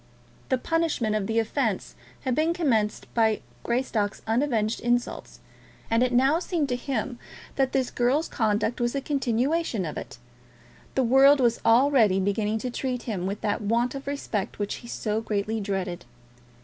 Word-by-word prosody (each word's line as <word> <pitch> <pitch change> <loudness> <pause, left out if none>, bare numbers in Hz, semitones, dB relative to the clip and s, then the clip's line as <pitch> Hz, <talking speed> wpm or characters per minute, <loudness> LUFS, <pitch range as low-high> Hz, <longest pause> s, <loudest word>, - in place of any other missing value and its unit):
The 260 - +2
punishment 300 -7 0
of 205 -2 -1
the 225 - -1
offence 225 -2 0 0.3
had 260 - -1
been 315 +5 +2
commenced 225 -11 +1
by 220 -2 +2 0.2
Greystock's 235 -4 -1
unavenged 225 -2 +1
insults; 240 0 -2 0.5
and 230 +1 +3
it 255 0 +2
now 265 +6 +4
seemed 335 -5 -1
to 250 - +1
him 245 -1 -3 0.4
that 270 -1 +1
this 260 -2 0
girl's 260 +6 +1
conduct 220 +1 0
was 240 +2 0
a - - +1
continuation 265 - 0
of 155 - -4
it. - - -10 0.8
The 265 - +3
world 270 +4 +6
was 235 -2 +2
already 230 -5 +4
beginning 205 +3 0
to 250 - -2
treat 250 0 -3
him 190 -6 -3
with 200 +2 -4
that 205 +1 -1
want 235 +4 +1
of 275 0 -7
respect 280 -8 -3
which 205 -1 -3
he 240 - -12
so 215 -2 -2
greatly 215 0 -2
dreaded. 190 -4 -3
235 Hz, 160 wpm, -26 LUFS, 215-270 Hz, 0.8 s, world